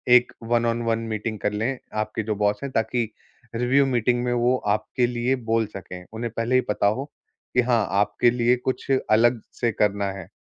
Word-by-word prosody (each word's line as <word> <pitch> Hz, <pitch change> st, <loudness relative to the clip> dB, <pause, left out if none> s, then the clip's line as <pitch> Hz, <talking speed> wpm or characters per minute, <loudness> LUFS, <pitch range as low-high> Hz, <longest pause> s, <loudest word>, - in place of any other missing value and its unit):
एक 125 Hz, 0 st, +5 dB
one on one 115 Hz, -1 st, +1 dB
meeting 110 Hz, 0 st, -3 dB
कर 105 Hz, -, 0 dB
लें, 120 Hz, +6 st, -1 dB, 0.2 s
आपके 110 Hz, 0 st, -2 dB
जो 105 Hz, 0 st, -2 dB
बॉस 105 Hz, 0 st, +1 dB
हैं, 140 Hz, -, -4 dB
ताकि 115 Hz, -1 st, 0 dB, 0.5 s
रिव्यू 130 Hz, +4 st, +3 dB
मीटिंग 120 Hz, -1 st, +1 dB
में 125 Hz, -, 0 dB
वो 120 Hz, +1 st, +2 dB
आपके 110 Hz, +4 st, +1 dB
लिए 120 Hz, +2 st, 0 dB
बोल 115 Hz, -2 st, 0 dB
सकें, 90 Hz, -2 st, -8 dB
उन्हें 115 Hz, 0 st, -4 dB
पहले 115 Hz, +3 st, +1 dB
ही 130 Hz, -, +5 dB
पता 105 Hz, -1 st, 0 dB
हो 110 Hz, +6 st, 0 dB, 0.5 s
कि 125 Hz, -, +6 dB
हाँ, 120 Hz, -3 st, +2 dB
आपके 105 Hz, +4 st, +3 dB
लिए 120 Hz, 0 st, +3 dB
कुछ 130 Hz, +1 st, -3 dB, 0.2 s
अलग 120 Hz, +2 st, +4 dB
से 120 Hz, -1 st, 0 dB
करना 100 Hz, -1 st, +1 dB
है। 95 Hz, -3 st, -8 dB
115 Hz, 185 wpm, -24 LUFS, 105-125 Hz, 0.5 s, कि